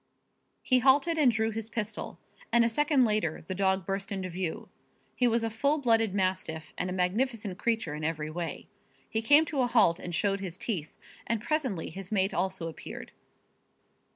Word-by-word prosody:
He 255 -1 +4
halted 285 +6 +4
and 270 -5 +6
drew 220 0 0
his 220 0 -4
pistol, 215 -2 -4 0.3
and 235 0 +5
a - - +2
second 285 +1 +3
later 210 -8 0
the 185 - -4
dog 190 -1 +1
burst 195 +1 -3
into 190 -2 -3
view. 175 -2 -4 0.5
He 250 - +3
was 230 0 +2
a 225 - 0
full 280 +7 +1
blooded 225 -7 +2
mastiff 185 -4 -2
and 180 - -2
a - - -3
magnificent 200 +2 -1
creature 225 -9 0
in 150 +1 -6
every 155 -1 -2
way. 170 +1 -5 0.4
He 220 - -2
came 290 +7 +6
to 290 -3 -1
a 245 - +2
halt 215 -8 +4
and 175 -1 -4
showed 200 +1 +1
his 185 -3 -5
teeth, 180 -9 -3 0.4
and 230 -1 0
presently 255 - -2
his 195 +1 -7
mate 195 -1 +2
also 190 -3 -1
appeared. 160 - -8
210 Hz, 180 wpm, -29 LUFS, 185-235 Hz, 0.5 s, and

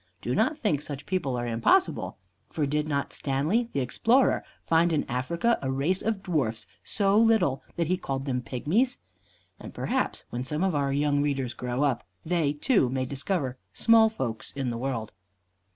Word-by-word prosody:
Do - - -2
not 310 - +2
think 150 - 0
such 145 -2 -7
people 165 -9 -1
are 120 - -2
impossible, 120 - +1 0.3
for 150 - -1
did 150 +2 -1
not 140 -2 -2
Stanley, 155 - 0
the 140 - -1
explorer, 230 - +2 0.2
find 165 +1 +3
in 155 -2 +1
Africa 170 - 0
a 130 - -2
race 145 +8 0
of 215 -3 -2
dwarfs 115 - -1 0.2
so 200 -1 +1
little 220 -13 +3
that 170 - 0
he 180 +3 +1
called 135 -4 -4
them 125 -3 -1
pygmies? 185 - 0 0.6
And - - -10
perhaps - - -1
when 120 +1 -3
some 150 +6 -1
of 190 -2 +1
our 140 -2 0
young 145 0 +2
readers 135 -4 -1
grow 125 +2 -2
up, 135 -5 +1 0.2
they, 165 -3 +1
too, 145 - +2
may 130 0 -1
discover 135 -1 -2
small 225 -1 +5
folks 120 - -3
in 135 -3 -3
the 115 - -3
world. 120 -4 -3
145 Hz, 175 wpm, -27 LUFS, 130-185 Hz, 0.6 s, small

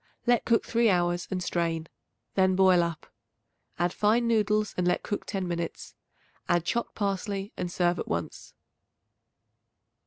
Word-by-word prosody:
Let 240 -1 +3
cook 230 -1 +2
three 235 -1 +2
hours 175 -2 +1
and 185 -2 -2
strain; 165 -2 -1 0.5
then 190 -1 +3
boil 185 -2 +5
up; 170 -2 -4 0.6
add 175 +1 0
fine 225 +3 +2
noodles 215 -2 +1
and 180 -1 0
let 180 - +1
cook 205 - -4
ten 190 -3 -2
minutes. 170 -1 -4 0.6
Add 175 -1 +2
chopped 235 +6 -2
parsley 200 0 -2
and 180 -1 -4
serve 175 0 +1
at - - -4
once. - - -5
185 Hz, 145 wpm, -28 LUFS, 175-210 Hz, 0.6 s, boil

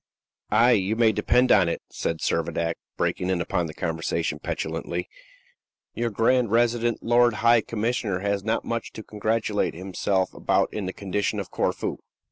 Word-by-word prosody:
"Ay, 115 +4 +5
you 105 -2 +2
may 115 -1 +4
depend 125 +5 +2
upon 90 -5 +5
it," - - -2
said 80 -1 -3
Servadac, 85 0 0 0.2
breaking 90 - -1
in 95 -2 +1
upon 85 0 -1
the 80 - -8
conversation 80 0 -2
petulantly, - - -3 0.9
"your 120 0 -1
grand 115 +2 +2
resident 120 0 +1
lord 120 -1 +4
high 115 -1 +6
commissioner 110 -3 -1
has 100 -1 -1
not 110 +2 -1
much 115 -1 -3
to 110 - -8
congratulate 110 -2 -1
himself 95 +1 -1
about - - +1
in 105 -3 -3
the - - -2
condition 100 +1 -2
of - - -6
Corfu." - - -1
105 Hz, 155 wpm, -25 LUFS, 95-115 Hz, 0.9 s, high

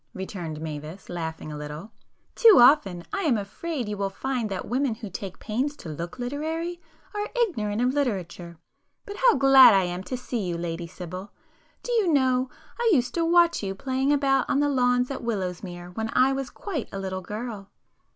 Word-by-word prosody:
returned 175 -5 -5
Mavis, 155 +3 -7
laughing 160 -2 -5
a 150 - -6
little—"Too 185 - +1
often 220 - +5
I 395 - -1
am 290 - +2
afraid 245 +6 -4
you 210 0 -4
will 195 0 -1
find 245 +2 -3
that 190 -2 -3
the - - -11
women 255 0 0
who 220 -3 -8
take 190 0 -6
pains 255 +7 -2
to 165 - -9
look 170 +8 -6
literary 320 +7 -3 0.3
are 415 0 -3
ignorant 225 - 0
of 250 +1 +2
literature! 180 - -3 0.5
But 405 0 -7
how - - +5
glad 265 -4 +8
I 190 - +4
am 175 0 -3
to 255 - -3
see 250 -1 -4
you, 175 -4 -2
Lady 170 0 -4
Sibyl! 185 +3 -8 0.5
Do - - -4
you 435 -7 +2
know 260 -3 +2 0.3
I 475 -1 +3
used 250 -8 +2
to 335 - 0
watch 340 0 +4
you 195 -1 -3
playing 265 +5 0
about 275 -2 +2
on 280 - +2
the 290 0 +2
lawns 250 -1 +2
at 270 - -4
Willowsmere 180 -5 -4
when 220 0 -2
I 265 +1 +4
was 270 -1 -3
quite 320 - -5
a - - -5
little 190 -1 -4
girl?" 210 +1 -6
235 Hz, 190 wpm, -26 LUFS, 185-275 Hz, 0.5 s, glad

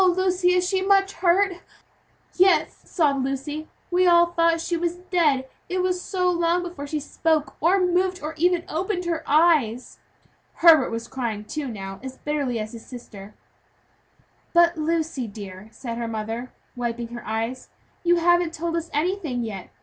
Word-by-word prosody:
Lucy, 365 0 +2
is 360 0 +2
she 380 0 0
much 390 0 +3
hurt?" 370 +1 +2 0.8
"Yes," 375 +1 +3
sobbed 280 -6 +1
Lucy, 280 +4 -4 0.2
"we 365 +1 +3
all 345 0 +6
thought 335 -1 +3
she 345 +1 -2
was 340 0 -1
dead, 335 -7 +1 0.2
it 365 0 0
was 365 -1 0
so 365 -2 -1
long 345 0 +1
before 345 -5 -7
she 305 +1 -2
spoke, 310 +1 -1
or 360 +5 +4
moved, 365 0 +1
or 305 +2 -5
even 350 +1 +1
opened 360 +3 -2
her 335 -2 -1
eyes." 290 -7 +2 0.5
Herbert 320 -6 +6
was 230 0 -5
crying, 230 -5 -4
too, 300 +4 -4
now, 195 -4 -7
as 260 0 -8
bitterly 285 -5 -2
as 215 0 -4
his 230 -1 -10
sister. 210 -5 -11 1.2
"But, 345 0 +5
Lucy 315 -5 -1
dear," 200 -1 -9
said 230 +1 -6
her 235 - -2
mother, 225 +2 -4 0.2
wiping 235 -1 -3
her 240 0 -8
eyes, 225 +4 -3 0.3
"you 350 0 +4
haven't 345 -1 +2
told 335 +1 -2
us 335 0 -3
anything 305 -6 -1
yet. 200 -5 -6
320 Hz, 160 wpm, -24 LUFS, 245-355 Hz, 1.2 s, all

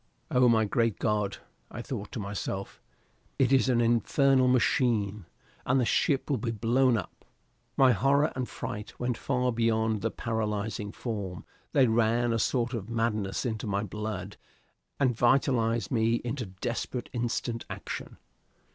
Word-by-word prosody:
Oh, 125 -1 +5
my 110 -1 +4
great 115 -1 +1
God, 105 -2 0 0.3
I 120 - -7
thought 115 -7 -5
to - - -4
myself, 100 -1 -5 0.6
it 135 -1 +3
is 135 0 +4
an 120 -2 +3
infernal 130 +3 +3
machine! 110 -6 +1 0.4
and 130 +2 +2
the 125 - +2
ship 135 +3 +1
will 140 -5 0
be 115 - -2
blown 120 +3 +2
up! 95 - -7 0.5
My 130 -2 +6
horror 135 +7 +3
and 130 -1 -3
fright 105 +1 -6
went 125 -1 -1
far 125 -1 0
beyond 110 -2 +1
the 115 - 0
paralyzing 105 -2 -3
form; 100 -7 -5 0.3
they 135 - +5
ran 115 +1 +2
a 115 - 0
sort 120 +1 0
of 110 -3 -4
madness 110 -3 -1
into 110 -2 -3
my 100 0 0
blood 105 -1 -5 0.6
and 130 -4 +2
vitalized 120 -3 +2
me 115 -1 +2
into 120 -2 -3
desperate 120 +5 -4
instant 120 -1 -2
action. - - -6
115 Hz, 145 wpm, -28 LUFS, 105-125 Hz, 0.6 s, My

